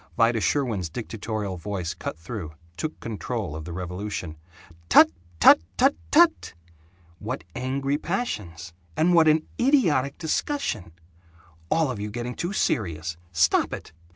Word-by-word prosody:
Vida 115 -1 +3
Sherwin's 110 - 0
dictatorial 110 -1 -4
voice 90 -2 -3
cut - - -6
through, 85 -2 -7 0.2
took 155 - -4
control 110 -6 -4
of 80 -1 -6
the 85 - -6
revolution: 90 -1 -5 0.5
"Tut, - - +8 0.3
tut, - - +8 0.2
tut, 270 +2 +4
tut! 330 - +4 0.6
What - - -4
angry 135 +3 -1
passions 100 - -4 0.2
and 175 +3 +3
what 165 -2 +6
an 155 0 +4
idiotic 175 - +3
discussion! 160 - -2 0.8
All 160 -4 +2
of 115 - -5
you 105 +1 -3
getting 120 +3 -4
too 175 +7 -3
serious. 85 - -1 0.2
Stop 85 0 +3
it! - - -7
115 Hz, 130 wpm, -25 LUFS, -, 0.8 s, Tut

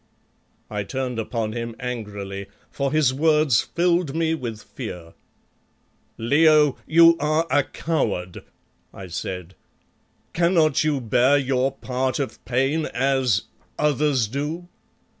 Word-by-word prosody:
I 105 -1 -3
turned 125 +1 -3
upon 110 -1 -2
him 115 -1 -5
angrily, 105 -6 -5 0.2
for 140 -1 -2
his 150 -4 +3
words 150 -2 +3
filled 170 -4 0
me 165 -1 +1
with 120 -8 -5
fear. 90 -9 -8 1.0
"Leo, 150 +3 +4
you 165 +1 +7
are 155 +2 +1
a 145 - +4
coward!" 105 - -2 0.5
I 95 - -8
said. 90 +1 -5 0.8
"Cannot 165 -4 +3
you 150 -3 0
bear 125 +4 +3
your 135 -1 +1
part 130 -1 -2
of 140 -2 -4
pain 135 +5 0
as 130 -3 +1 0.3
others 145 -5 +1
do?" 150 +8 -4
135 Hz, 115 wpm, -23 LUFS, 115-155 Hz, 1.0 s, you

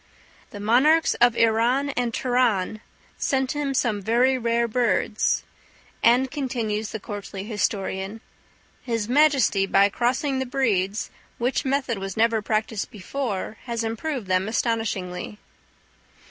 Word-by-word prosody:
"The 205 - -9
monarchs 265 +10 +4
of 240 -1 +5
Iran 235 +5 +2
and 245 -3 -1
Turan 230 -5 0 0.4
sent 265 -1 0
him 290 -2 -2
some 220 -4 0
very 240 +6 +3
rare 235 -1 +1
birds;" 225 -2 +1 0.6
and, 250 +3 +4
continues 230 -7 -2
the 220 - -5
courtly 200 -1 -7
historian, 205 -1 -2 0.6
"His 230 -4 -2
Majesty, 260 -7 +3
by 200 +1 +4
crossing 260 +5 0
the 265 - -2
breeds, 215 -7 0 0.3
which 245 +4 -1
method 265 -5 0
was 195 0 -5
never 225 0 +3
practised 215 0 -2
before, 215 -1 -4
has 235 -2 -2
improved 230 +2 -3
them 185 +1 +1
astonishingly." 210 -5 -2
230 Hz, 120 wpm, -24 LUFS, 210-255 Hz, 0.6 s, of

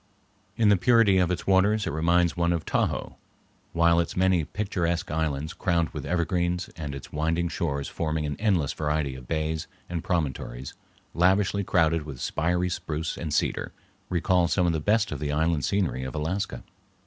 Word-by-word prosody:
In 110 -2 +4
the 100 - +5
purity 105 -1 +4
of 90 -2 +2
its 90 -1 -2
waters 100 +3 +3
it - - -2
reminds 85 +3 +2
one 85 0 +1
of 80 -2 -3
Tahoe, - - -1 0.5
while 85 0 +4
its 85 - -2
many 95 -2 +3
picturesque 85 -1 -2
islands 80 -1 -1
crowned 85 -4 0
with - - -6
evergreens, 90 0 0
and 75 -3 -5
its 70 - -9
winding 80 +3 0
shores 70 -5 -2
forming 80 -1 -2
an 75 -1 -2
endless 95 -10 +1
variety 75 -2 -1
of 65 -2 -10
bays 80 -1 -2 0.2
and 85 -2 -4
promontories 65 -6 -3 0.4
lavishly 95 +3 +2
crowded 80 -3 +2
with 70 -4 -8
spiry 90 +5 0
spruce 80 -2 -3
and 80 -3 -5
cedar, 75 - -1 0.4
recall 90 0 +2
some 90 +1 +2
of 85 - +2
the 80 - 0
best 105 +7 +2
of 75 - -4
the 75 0 -2
island 80 0 +1
scenery 90 -7 0
of 65 +2 -5
Alaska. 90 +7 -2
85 Hz, 170 wpm, -26 LUFS, 75-90 Hz, 0.5 s, the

